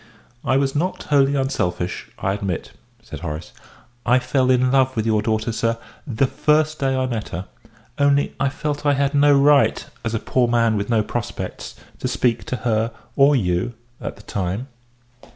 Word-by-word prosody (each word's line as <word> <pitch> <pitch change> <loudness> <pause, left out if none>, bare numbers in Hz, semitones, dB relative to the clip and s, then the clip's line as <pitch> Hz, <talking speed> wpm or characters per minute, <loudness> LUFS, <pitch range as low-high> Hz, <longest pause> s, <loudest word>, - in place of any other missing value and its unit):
"I 130 - +2
was 135 0 0
not 175 +6 -1
wholly 140 -1 +3
unselfish, 90 -10 -2
I 95 - -1
admit," 100 -4 -3 0.3
said - - -8
Horace. 80 -1 -6 0.5
"I 125 - +4
fell 130 +1 +1
in 125 0 +3
love 130 -1 +3
with 110 -1 -1
your 110 -2 +2
daughter, 110 +1 0
sir, 115 +1 0 0.3
the 130 0 +1
first 150 +2 +1
day 135 -1 +1
I 130 0 +1
met 115 -4 -3
her 90 +3 -5 0.5
only 140 0 +3
I 140 - +2
felt 145 +1 -3
I 145 -1 +3
had 140 +1 +1
no 145 0 +5
right, 145 0 +4 0.2
as 115 0 -2
a - - 0
poor 125 +2 +1
man 115 -2 +2
with 100 +1 -2
no 110 -2 +3
prospects, 115 +1 -5 0.2
to - - -2
speak 120 -2 0
to - - -2
her 115 0 +1 0.2
or 140 +1 +5
you 95 0 0 0.3
at - - -5
that - - -17
time." 100 +7 -3
125 Hz, 180 wpm, -21 LUFS, 110-140 Hz, 0.5 s, no